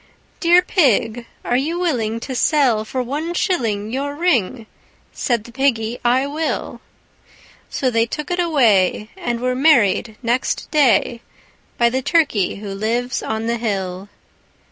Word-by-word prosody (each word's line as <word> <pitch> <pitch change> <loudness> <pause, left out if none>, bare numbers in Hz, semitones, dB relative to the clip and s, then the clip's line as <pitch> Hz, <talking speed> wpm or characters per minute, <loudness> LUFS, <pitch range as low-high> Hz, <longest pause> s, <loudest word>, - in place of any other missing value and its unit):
III - - -34
"Dear 350 +1 +5
Pig, 245 - +1 0.2
are 245 - 0
you 305 +7 0
willing 235 -11 -1
to 265 - -5
sell 255 -5 +2
for 255 +3 -3
one 305 +7 -4
shilling 225 - -1
Your 285 +2 -3
ring?" 255 - 0 0.5
Said 235 -4 -1
the 235 - -13
Piggy, 240 -3 0
"I 250 +3 +2
will." 305 +3 -3 0.9
So 260 -2 -1
they 230 0 +1
took 300 +8 -5
it 355 - -1
away, 225 - +2
and 240 -1 -3
were 255 +1 0
married 235 -6 +3
next 240 +2 -1
day 245 -5 +2 0.6
By 235 0 +3
the 260 +1 -1
turkey 265 - +1
who 200 -1 -7
lives 235 +5 -2
on 220 +1 -3
the 235 +1 -1
hill. 195 -3 -3
245 Hz, 145 wpm, -19 LUFS, 220-285 Hz, 0.9 s, Dear